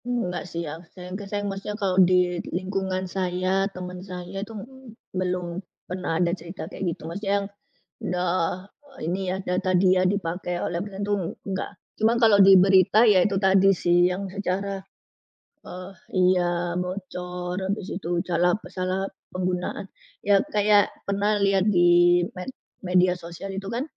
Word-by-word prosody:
Enggak 215 -8 -2
sih, 170 +1 -4
yang 160 +2 -7 0.5
saya 205 0 -2
maksudnya 200 +1 -4
kalau 190 -3 +2
di 180 -1 +3
lingkungan 190 0 -2
saya, 185 +1 0
teman 180 -1 -7
saya 185 0 -7
itu 220 +3 -7
m - - -6 0.5
belum 180 -1 -2 0.2
pernah 180 -3 -3
ada 175 0 +1
cerita 175 +1 -7
kayak - - -7
gitu, 170 - -6
maksudnya 195 +5 -2
yang - - -6 0.6
udah 180 0 0 0.7
ini 175 +4 -1
ya, 185 - -1
data 185 +1 0
dia 185 0 +4
dipakai 180 -2 -2
oleh 170 0 -2
orang 200 0 -5
itu, 205 - 0 0.3
enggak. 190 -1 -3 0.3
Cuma 225 +2 +4
kalau 220 -4 +6
di 195 0 +9
berita 190 +4 +5
ya 205 -5 +6
itu 200 -2 +1
tadi 190 0 +4
sih 175 +1 +3
yang 185 +2 -3
secara, 195 0 -2 0.9
eee 185 +1 -8 0.2
iya 175 -1 +2
bocor, 180 -1 -4
habis 195 0 -3
itu 175 -2 -1
salah 175 0 +2 0.2
salah 185 +1 -2 0.3
penggunaan, 180 0 -3 0.3
ya 200 -1 +4 0.2
kayak 205 -1 +4
pernah 205 +1 0
lihat 195 -1 +3
di 175 -2 +5 0.2
med 185 - -5 0.4
media 180 0 +3
sosial 175 +3 -8
itu 195 +1 -5
kan. 235 +5 -2
185 Hz, 150 wpm, -25 LUFS, 180-195 Hz, 0.9 s, di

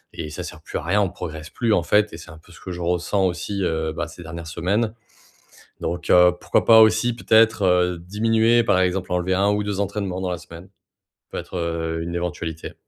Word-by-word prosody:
et 80 -2 -5
ça 75 - -6
sert - - -9
plus - - -5
à - - -5
rien, 95 +5 +2
on 100 - +1
progresse 80 -3 -7
plus 115 -2 0
en 90 - +3
fait 105 +4 +2
et - - -7
c'est 85 - -12
un 80 - -12
peu 80 +2 -19
ce 85 - -15
que 95 - -8
je 90 - -6
ressens 90 +3 0
aussi, 95 +2 -2
heu, 80 -2 -1
bah, - - -3
ces - - -12
dernières 85 +1 -8
semaines. 100 +7 -1 0.9
Donc, 85 0 -4
heu, 90 0 +6
pourquoi - - +1
pas 110 -1 +8
aussi 120 +2 +3
peut-être, 110 -2 +3
heu, 90 -1 +2
diminuer, 115 +5 +2
par 100 - +3
exemple 95 0 -1
enlever 90 +1 0
1 100 +2 +2
ou 105 0 0
2 100 -1 -3
entraînements 100 -2 -2
dans 90 -1 -2
la 90 - -2
semaine. 85 +1 -13 0.6
Peut - - -5
être, - - -7
heu, 80 -1 -2
une 85 +1 -5
éventualité. 85 -2 -4
90 Hz, 225 wpm, -22 LUFS, 85-105 Hz, 0.9 s, pas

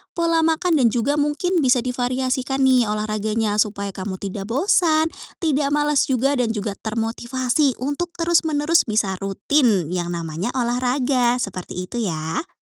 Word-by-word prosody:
pola 335 -1 +2
makan, 320 0 +2
dan 240 - +5
juga 250 +6 0
mungkin 315 +5 0
bisa 250 -3 +3
divariasikan 255 +2 -1
nih 255 -4 +4
olahraganya 215 0 -1
supaya 200 -2 0
kamu 190 0 -5
tidak 195 +1 -6
bosan, 315 - +2 0.3
tidak 290 -2 +1
malas 295 -1 +2
juga 270 +1 +1
dan 230 -2 0
juga 205 0 -2
termotivasi 240 +4 -1
untuk 335 +5 -3
terus 335 0 +2
menerus 305 0 +2
bisa 205 -3 0
rutin 195 - +1
yang 175 -1 -2
namanya 165 +4 -4
olahraga. 245 0 +1
Seperti 185 -2 -5
itu 240 +6 -5
ya. 165 - -3
245 Hz, 145 wpm, -21 LUFS, 210-290 Hz, 0.3 s, dan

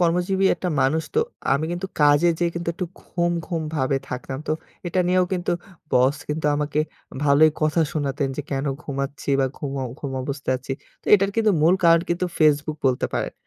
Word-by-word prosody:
কর্মজীবী 180 +3 +2
একটা 180 - -3
মানুষ। 155 +5 +2
তো, 455 - +4 0.3
আমি 140 +3 +1
কিন্তু 175 +2 -3
কাজে 145 +3 +5
যেয়ে 170 -1 +1
কিন্তু 170 0 -3
একটু 180 - -3
ঘুম, 175 -1 -1 0.2
ঘুম 165 -4 -2
ভাবে 135 -1 +1
থাকতাম। 130 +1 -5
তো - - +2 0.3
এটা 180 +2 +1
নিয়েও 185 0 +4
কিন্তু 180 -2 0 0.4
বস 130 +3 +4
কিন্তু 150 0 -1
আমাকে 150 0 0 0.4
ভালোই 145 +2 +6
কথা 155 +2 +2
শোনাতেন। 140 -2 -1
যে 150 - -2
কেন 135 0 -1 0.2
ঘুমাচ্ছি 140 0 -5
বা 135 - +3
ঘুম, 145 -3 -4 0.3
ঘুম 140 -2 -5
অবস্থায় 140 0 -2
আছি? 130 +1 -5 0.3
তো - - -31
এটার 195 -1 +3
কিন্তু 220 -1 +4
মূল 170 +4 +6
কারণ 165 0 +7
কিন্তু 175 +1 0
Facebook 150 0 +3
বলতে 125 - 0
পারেন। - - -2
155 Hz, 185 wpm, -23 LUFS, 140-175 Hz, 0.4 s, কারণ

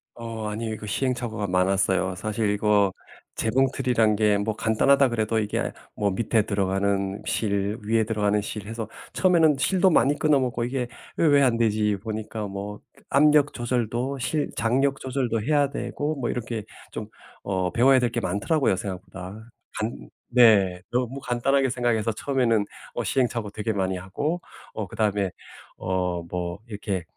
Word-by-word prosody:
어 115 -2 -5
아니에요. 110 +1 -3
그 105 - -9
시행착오가 120 -2 -2
많았어요. 95 0 +1
사실 105 +3 -1
이거 105 -2 +2 0.4
재봉틀이란 125 -2 +2
게 105 -1 +3
뭐 105 +1 -1
간단하다 130 +5 +3
그래도 110 -1 0
이게 105 -1 -1 0.2
뭐 100 -1 +1
밑에 110 +2 +1
들어가는 100 0 0
실, 100 0 -1
위에 110 +1 +2
들어가는 105 -1 +1
실 105 0 -6
해서 115 -1 -5 0.3
처음에는 165 -5 +4
실도 190 +6 +3
많이 145 -3 +4
끊어 150 -3 +4
먹고 120 -2 -1
'이게 125 0 -2 0.3
왜 - - +3
왜 145 -1 +5
안 125 -4 +3
되지?' 105 -2 +2
보니까 110 -1 -4
뭐 100 +1 -6 0.3
압력 150 +1 +4
조절도 120 +2 -1
실 145 +4 -1
장력 135 +4 +1
조절도 125 -4 -1
해야 145 +3 +2
되고 145 +2 -3
뭐 130 -5 -2
이렇게 115 -2 -3 0.3
좀 - - -5 0.4
어 95 -2 -1
배워야 130 +4 +5
될 120 -1 +1
게 120 - -1
많더라고요, 100 - +1
생각보다. 95 +2 -7 0.3
간 110 +2 -4 0.3
네 100 -7 +6
너무 125 +2 -1
간단하게 135 +2 +1
생각해서 120 -3 0
처음에는 115 -3 +1 0.3
어 - - -1
시행착오 120 -5 0
되게 110 +1 -2
많이 95 -1 -1
하고 145 - -3 0.3
어 105 -3 -4
그다음에 105 -1 0 0.5
어 90 -2 -1
뭐 90 0 -3
이렇게 100 -4 -3
110 Hz, 325 characters per minute, -25 LUFS, 100-125 Hz, 0.5 s, 네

